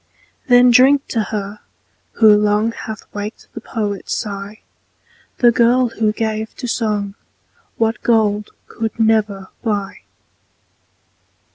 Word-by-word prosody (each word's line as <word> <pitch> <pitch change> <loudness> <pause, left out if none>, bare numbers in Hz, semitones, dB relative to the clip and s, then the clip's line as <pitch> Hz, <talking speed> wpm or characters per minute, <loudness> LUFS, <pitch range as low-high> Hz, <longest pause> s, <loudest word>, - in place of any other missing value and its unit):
Then 245 -1 +6
drink 270 +3 +5
to 225 - 0
her, 205 0 -5 0.5
who 215 -2 +6
long 210 +2 +1
Hath 220 -1 -8
waked 210 +2 -6
the - - -8
poet's 205 -4 -3
sigh, 205 0 -6 0.8
The 240 -1 +5
girl, 240 +1 +3
who 220 -1 0
gave 220 0 -3
to 250 - -5
song 210 -4 -1 0.6
What 225 0 0
gold 210 -3 +1 0.2
could 225 0 -5
never 215 -3 +1
buy. 205 -4 -2
220 Hz, 115 wpm, -18 LUFS, 210-230 Hz, 0.8 s, Then